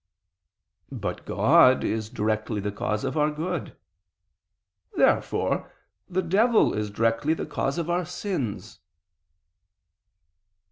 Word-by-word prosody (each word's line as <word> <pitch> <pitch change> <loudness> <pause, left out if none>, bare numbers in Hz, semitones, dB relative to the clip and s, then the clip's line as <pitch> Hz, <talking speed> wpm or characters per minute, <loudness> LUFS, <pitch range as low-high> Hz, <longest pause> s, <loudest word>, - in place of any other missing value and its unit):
But 125 -7 -5
God 130 0 +5
is 110 -1 -2
directly 110 0 -1
the 105 +1 -3
cause 105 +1 -2
of - - -2
our 150 -1 +2
good. 160 +2 -4 1.2
Therefore - - +1 0.4
the 185 +1 0
devil 215 +7 +3
is 105 0 -2
directly 115 +8 +1
the - - -4
cause 135 +4 -2
of 170 -2 -2
our 175 +1 0
sins. 175 - -4
135 Hz, 105 wpm, -25 LUFS, 110-175 Hz, 1.2 s, God